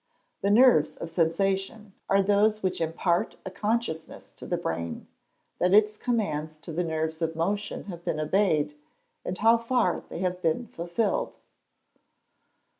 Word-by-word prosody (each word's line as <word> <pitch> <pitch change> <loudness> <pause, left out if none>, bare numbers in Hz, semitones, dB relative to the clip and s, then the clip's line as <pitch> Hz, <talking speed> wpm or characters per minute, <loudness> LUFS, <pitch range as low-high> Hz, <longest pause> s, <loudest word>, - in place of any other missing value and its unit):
_ - - -50
The 200 - +1
nerves 215 - +5
of 165 - -6
sensation 195 +5 0 0.2
are 195 0 +4
those 210 +2 +2
which 185 -2 -1
impart 170 +2 0
a 190 - -5
consciousness 210 -6 -3
to - - -11
the - - 0
brain 85 0 -4 0.5
that 180 +2 +4
its 210 0 +5
commands 155 -11 -2
to 165 - -8
the 175 +3 0
nerves 160 0 -2
of 165 0 -1
motion 200 +5 -2
have 175 -4 -9
been 155 - -2
obeyed, 155 -2 +1 0.5
and 180 - -4
how 225 +3 +5
far 230 -5 +1
they - - -6
have 180 0 -2
been 165 +9 0
fulfilled. 210 - -2
185 Hz, 150 wpm, -27 LUFS, 160-210 Hz, 0.5 s, nerves